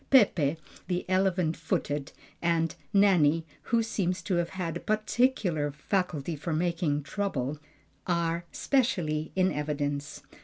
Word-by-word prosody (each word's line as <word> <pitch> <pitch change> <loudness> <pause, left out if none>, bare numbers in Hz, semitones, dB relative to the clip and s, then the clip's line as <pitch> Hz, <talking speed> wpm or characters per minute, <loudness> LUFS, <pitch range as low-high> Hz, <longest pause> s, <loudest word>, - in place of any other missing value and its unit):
Peppe, 165 - +4 0.3
the 180 0 -2
"elephant 185 -3 +2
footed," 145 -3 -2 0.3
and 165 -1 +1 0.2
Nanny, 170 -6 +4 0.2
who 230 -1 +2
seems 185 -5 -1
to 185 -3 0
have 170 0 0
had 170 -4 -2
a - - -2
particular 215 - +1
faculty 160 0 -1
for 155 +3 -3
making 165 -3 0
trouble, 145 -6 -2 0.5
are 170 -1 0
specially 170 - 0
in 185 0 +3
evidence. 145 -1 -3
170 Hz, 120 wpm, -29 LUFS, 150-190 Hz, 0.5 s, Peppe